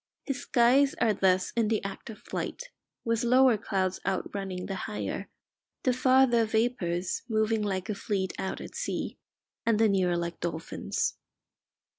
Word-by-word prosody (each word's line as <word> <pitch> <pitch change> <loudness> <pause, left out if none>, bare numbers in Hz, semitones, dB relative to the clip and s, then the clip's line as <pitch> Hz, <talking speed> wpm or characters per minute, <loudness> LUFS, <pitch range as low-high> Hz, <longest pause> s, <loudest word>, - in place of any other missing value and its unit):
His 275 -3 -3
skies 260 +3 +4
are 225 -3 +3
thus 185 -1 +2
in 230 -2 +2
the 215 -2 0
act 200 +3 -6
of 220 - -8
flight, - - -5 0.3
with 230 0 +1
lower 255 0 +5
clouds 190 -3 -1
outrunning 190 -1 -3
the 195 - -4 0.2
higher, 210 - -4 0.5
the 255 - +3
farther 255 -2 +4
vapours 215 -6 0
moving 220 0 +1
like 190 -3 -2
a 215 - -1
fleet 195 -2 -2
out 190 - -3
at - - -9
sea, - - -3 0.4
and 230 -2 +2
the 225 +1 +5
nearer 185 -3 +2
like 170 0 -3
dolphins. 165 -1 -2
215 Hz, 150 wpm, -29 LUFS, 190-235 Hz, 0.5 s, lower